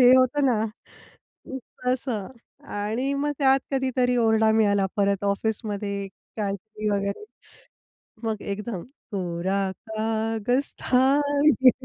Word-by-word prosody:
हे 250 -1 +8
होतं 260 +3 +3
ना. 240 -5 +2
अ, 235 +3 -11 0.3
तसं. 250 -5 0 0.4
आणि 220 +6 -2
मग 295 +1 0
त्यात 270 -1 +4
कधीतरी 255 -2 +1
ओरडा 220 -1 +4
मिळाला 205 -3 +3
परत 200 -1 +1
ऑफिसमध्ये 200 -1 -1 0.3
काहीतरी 210 +1 -3
वगैरे. 200 - -1 1.0
मग 220 -2 -2
एकदम 205 -3 -5 0.3
कोरा 185 +1 -1 0.3
कागज 225 +4 0
था 255 0 +3 0.6
ये. 255 - +10
220 Hz, 105 wpm, -25 LUFS, 200-250 Hz, 1.0 s, ये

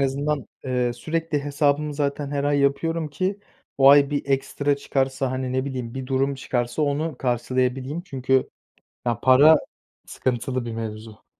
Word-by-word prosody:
azından, 140 -1 -1 0.2
eee, 125 -2 0
sürekli 155 +3 -2
hesabımı 145 +1 +1
zaten 140 0 -2
her 140 -1 -1
ay 145 0 +2
yapıyorum 150 +4 0
ki 185 +6 -2 0.4
o 135 0 +7
ay 140 0 +7
bir 145 - -1
ekstra 140 +1 0
çıkarsa, 135 -1 -1
hani, 130 0 -3
ne 130 0 0
bileyim, 125 -4 -5
bir 130 -1 -5
durum 135 +1 0
çıkarsa 120 +1 -2
onu 150 +1 -1
karşılayabileyim. 130 +4 -1
Çünkü 135 -6 0 0.6
ya, 115 -1 0
para 140 +6 +7 0.5
sıkıntılı 125 0 -2
bir 115 - -5
mevzu. 110 -1 -7
135 Hz, 145 wpm, -24 LUFS, 130-145 Hz, 0.6 s, o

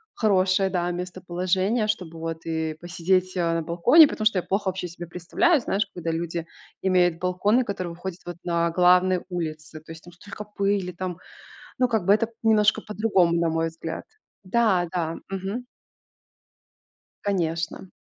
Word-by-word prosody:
хорошее, 190 -3 +2
да, 175 -1 0
местоположение, 185 +4 -1
чтобы 180 -6 -3
вот 165 0 -5
и 160 -1 -2
посидеть, 185 +2 0
э, 170 -1 +1
на 165 - 0
балконе. 240 - +6
Потому 215 - -4
что 205 -4 +4
я - - -5
плохо 195 0 -1
вообще 185 -1 -4
себе 175 +1 -8
представляю, 225 - +1
знаешь, 200 -2 0
когда 170 -2 -4
люди 165 0 -3 0.3
имеют 180 -3 +2
балконы, 200 +7 +2
которые 185 -5 -4
выходят 175 +1 -7
вот 175 -1 -7
на 170 -1 0
главные 180 +1 +4
улицы. 155 -3 -5
То 160 - -13
есть 160 0 -11
там 175 - -12
столько 205 +4 -9
пыли, 200 -3 -1
там, 180 0 -5 0.6
ну, 250 - +3
как 220 -6 0
бы, 200 - +6
это 215 +1 +2
п 230 - -22
немножко 220 -1 +4
по-другому, 210 -5 +2
на 170 - +2
мой 165 0 0
взгляд. 165 0 -6 0.4
Да, 190 -3 +2
да, 165 -2 -2
мгм. 195 +6 -4 1.6
Конечно. 170 -2 -2
180 Hz, 160 wpm, -25 LUFS, 170-200 Hz, 1.6 s, балконе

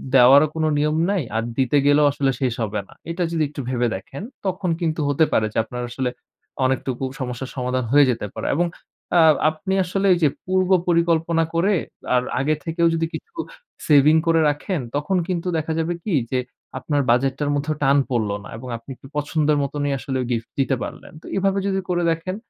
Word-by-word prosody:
দেওয়ারও 135 +4 +7
কোনো 160 -1 +1
নিয়ম 150 +1 +1
নাই। 195 -6 0
আর 115 - 0
দিতে 135 +1 +2
গেলেও 145 +1 +5
আসলে 135 -1 0
শেষ 130 -3 +1
হবে 105 -1 -2
না। - - -16 0.2
এটা 175 +2 -2
যদি 165 -2 +1
একটু 145 -1 -6
ভেবে 125 -1 +1
দেখেন 130 - -8 0.2
তখন 185 -1 -1
কিন্তু 160 -1 -1
হতে 145 +3 +3
পারে 110 - +3
যে, - - -5
আপনার 125 +2 -6
আসলে 125 +1 -2 0.6
অনেকটুকু 130 0 -1 0.2
সমস্যার 125 0 -4
সমাধান 125 -1 -1
হয়ে 145 +1 +7
যেতে 115 -3 -4
পারে। - - -4
এবং 175 +3 +2 0.5
আ - - +7 0.3
আপনি 160 +5 -4
আসলে 195 +2 0
এইযে 165 -4 +3 0.2
পূর্ব 185 0 +1 0.2
পরিকল্পনা 170 -1 +2
করে 195 +5 +3 0.4
আর 125 - +3 0.2
আগে 150 +3 +1
থেকেও 170 +1 +1
যদি 165 0 0
কিছু 455 - -8 0.5
সেভিং 150 +1 +6
করে 165 0 +4
রাখেন 150 +5 -2 0.2
তখন 150 +6 0
কিন্তু 180 -1 -2
দেখা 160 0 -2
যাবে 165 +2 0
কি? 200 -6 0 0.2
যে 130 - +1 0.4
আপনার 145 -2 0
বাজেটটার 135 +4 +1
মধ্যেও 150 +2 -1
টান 140 +1 +4
পড়লো 110 -5 0
না। - - -10
এবং 130 +3 -9
আপনি 115 +4 -12 0.3
পছন্দের 150 0 +1
মতনই 145 +1 -2
আসলে 130 +3 -3
গিফট 115 -2 -2
দিতে 135 0 +2
পারলেন। - - -8
তো - - -17
এভাবে 195 0 +1
যদি 195 -1 0
করে 175 -1 +1
দেখেন, 165 +3 -3
150 Hz, 185 wpm, -22 LUFS, 130-170 Hz, 0.6 s, দেওয়ারও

